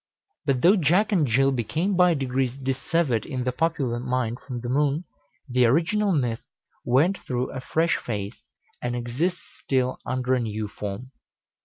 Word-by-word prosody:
But 135 -3 +1
though 185 +5 +7
Jack 185 +6 +3
and 170 -8 +3
Jill 135 +4 +3
became 155 - -1
by 180 -1 +5
degrees 130 -2 -1
dissevered 135 -1 0
in 130 -4 -4
the 125 - 0
popular 135 -4 0
mind 125 -1 -1
from 125 -3 -6
the 120 - -5
moon, 145 +5 +1 0.4
the 125 -2 +3
original 185 - +2
myth 125 -8 0 0.4
went 150 +11 +3
through 125 0 -3
a 130 - -5
fresh 165 +5 +1
phase, 105 -1 -5 0.4
and 120 0 -2
exists 135 +10 -1 0.2
still 130 -1 0
under 130 0 -1
a 130 - +2
new 110 -2 -3
form. 105 +5 -6
130 Hz, 160 wpm, -25 LUFS, 120-160 Hz, 0.4 s, though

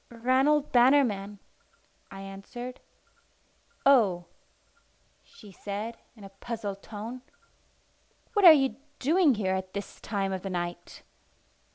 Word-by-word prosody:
"Ranald 265 +5 +1
Bannerman," 240 -6 +3 0.7
I 195 - -9
answered. 200 +6 -8 1.1
"Oh!" 205 -11 +4 1.0
she 210 - -16
said 205 +4 -6 0.2
in 215 - -15
a 195 - -10
puzzled 200 0 -6
tone. 225 +4 -8 1.1
"What 410 -3 +1
are 340 - +13
you 270 -6 +3 0.2
doing 310 0 +3
here 190 -3 -1
at 190 0 -4
this 200 0 -7
time 195 -2 -2
of 190 - -4
the 195 - -5
night?" 175 -1 -5
215 Hz, 110 wpm, -28 LUFS, 195-255 Hz, 1.1 s, are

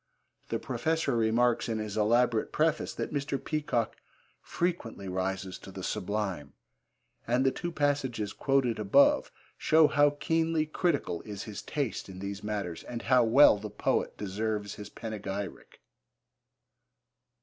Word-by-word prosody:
The - - 0
Professor 160 -5 -1
remarks 115 +1 +2
in 110 - -1
his 110 -2 -4
elaborate 115 +1 +2
preface 155 0 +1
that - - -4
Mr. 140 -1 -1
Peacock 145 -7 -2 0.4
'frequently 165 - -3
rises 95 0 -3
to - - -11
the - - -8
sublime,' 95 -8 -3 0.7
and 125 +3 +2
the 135 - +4
two 175 +5 -4
passages 140 -8 -1
quoted 135 -5 +1
above 105 +7 +4 0.3
show 160 0 +5
how 145 0 +3
keenly 165 -1 +1
critical 155 - -1
is 105 -2 -7
his 105 -2 -7
taste 140 -9 -3
in 95 - -9
these 100 +1 -5
matters 100 -6 -3
and 120 -1 -6
how 125 -1 +4
well 115 -1 +6
the 105 +1 -6
poet 105 - -1
deserves 105 +1 -3
his 105 - -9
panegyric. 100 -4 -6
115 Hz, 135 wpm, -29 LUFS, 105-145 Hz, 0.7 s, well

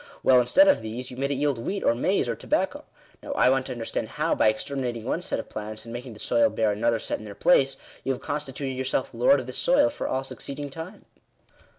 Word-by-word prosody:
Well, 130 -1 +6
instead 280 - +5
of 285 - +4
these, 120 +4 -6
you 125 - -9
made 140 +1 -1
it 140 - 0
yield 140 -2 0
wheat, 195 +12 -3
or - - +4
maize, 115 - +1
or - - -1
tobacco. - - -1 0.4
Now - - -5
I 125 - +4
want 130 0 +1
to - - -5
understand 120 -2 -3
how, - - 0
by - - +3
exterminating 120 +1 -2
one 165 - -1
set 185 - -2
of - - -6
plants, 110 0 -7
and 115 - -8
making 120 0 -7
the 105 - -13
soil 290 - +3
bear 110 - +1
another 115 +3 +1
set - - -4
in - - -10
their 100 -1 -9
place, 135 -6 +3 0.3
you 135 - 0
have 130 - -3
constituted 140 -2 -4
yourself 130 0 -2
lord 125 +4 +4
of 130 - -6
this 130 - -3
soil 290 +2 +4
for - - -4
all 130 +1 -1
succeeding 140 +1 -6
time." 165 +7 -9
130 Hz, 240 wpm, -26 LUFS, 115-145 Hz, 0.4 s, Well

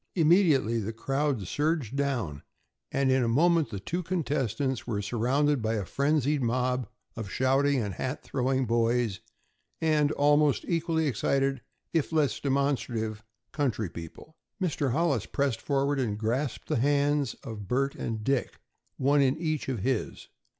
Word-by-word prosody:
Immediately 155 - +4
the 110 +1 -4
crowd 135 -1 -1
surged 145 - -1
down, 120 - -1 0.5
and 135 -1 +2
in 130 0 +3
a - - +1
moment 160 +4 +3
the 100 -3 -5
two 170 - -3
contestants 140 - -1
were 110 -4 -1
surrounded 125 +6 +1
by 110 +1 0
a 100 -3 -2
frenzied 145 +2 +1
mob 125 0 0 0.3
of 110 -4 -5
shouting 135 +3 +2
and 100 -4 -2
hat 130 +8 -4
throwing 130 0 0
boys, 115 -3 +1 0.6
and 150 -2 +2
almost 145 -1 +3
equally 165 -2 0
excited, 135 +1 0 0.3
if 165 -2 +1
less 155 -3 +1
demonstrative, 125 -6 -1 0.3
country 120 - -1
people. 85 - -10 0.2
Mr. 150 -7 0
Hollis 140 -6 +1
pressed 135 -5 -1
forward 140 0 0
and 110 -5 -1
grasped 120 +5 -2
the - - 0
hands 145 +1 +1
of 105 -3 -7
Bert 135 +5 +1
and 110 -2 -4
Dick, 135 -2 -1 0.4
one 140 +2 +3
in 135 +1 +2
each 155 -4 -2
of 125 -7 -2
his. 125 0 -2
135 Hz, 145 wpm, -28 LUFS, 115-145 Hz, 0.6 s, Immediately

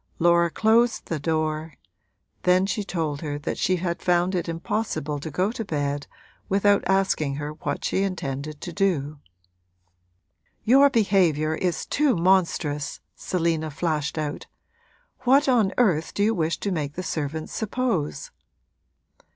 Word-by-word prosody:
Laura 170 0 +4
closed 225 +6 +2
the 165 - -3
door; 155 0 -2 0.7
then 180 +1 +3
she 210 +1 -2
told 160 -7 -3
her 145 -3 -3
that 145 - -3
she 185 - +2
had 170 -1 -3
found 180 +1 +2
it 175 -2 -2
impossible 165 -4 -2
to 160 - -6
go 185 +7 0
to 230 - -4
bed 145 -5 -2 0.4
without 200 +1 +3
asking 190 -7 +1
her 145 +1 -4
what 150 -2 -4
she 190 - +1
intended 150 -6 -3
to 175 - -6
do. 155 -7 0 1.4
'Your 275 +5 +6
behaviour 185 - +2
is 175 +2 -1
too 290 -5 +2
monstrous!' 170 -5 +1 0.2
Selina 165 -3 -1
flashed 155 0 -2
out. 150 -1 -4 0.7
'What 265 +3 +4
on 230 -7 +3
earth 180 -10 +2
do 205 - +1
you 220 +2 +3
wish 165 -4 0
to 200 - -1
make 150 -5 -2
the 185 - -4
servants 155 -2 -4
suppose?' 220 - -2
170 Hz, 140 wpm, -24 LUFS, 155-195 Hz, 1.4 s, Your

